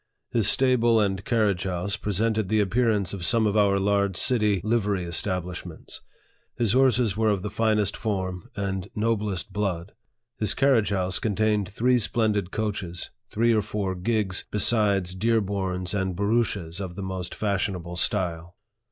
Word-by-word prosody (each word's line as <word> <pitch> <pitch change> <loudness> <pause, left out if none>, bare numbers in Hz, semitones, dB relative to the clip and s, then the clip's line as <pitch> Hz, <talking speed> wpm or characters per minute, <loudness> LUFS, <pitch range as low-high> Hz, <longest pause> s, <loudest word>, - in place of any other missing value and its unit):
His 110 -3 +4
stable 120 -3 +3
and 95 -2 0
carriage 105 -7 +1
house 95 +2 -2
presented 110 -1 -1
the 110 - +2
appear 115 +4 +2
ance 100 -4 0
of 95 -3 -5
some 115 +5 +3
of 105 -1 +1
our 100 -2 +3
large 100 -1 +1
city 105 -6 +2
livery 105 -4 0
establishments. 90 -1 -4 0.5
His 115 -4 +1
horses 125 -5 +3
were 110 0 +2
of 100 -3 0
the 105 - -4
finest 105 -3 +1
form 95 -5 -3
and 95 -1 -3
noblest 105 -4 -1
blood. 100 -3 -2 0.5
His 110 - +1
carriage 130 -6 +3
house 95 -2 0
contained 105 -2 0
three 125 +5 +2
splendid 105 -5 0
coaches, 100 -5 -4 0.2
three 115 +2 +2
or 110 - +3
four 100 -2 -3
gigs, 95 0 -1
besides 100 -4 +2
dearborns 95 -3 -1
and 95 -2 -1
barouches 100 -4 -1
of 90 -3 -6
the 100 - -5
most 95 -2 -5
fashionable 95 -4 -2
style. 90 -3 -1
100 Hz, 150 wpm, -25 LUFS, 95-110 Hz, 0.5 s, His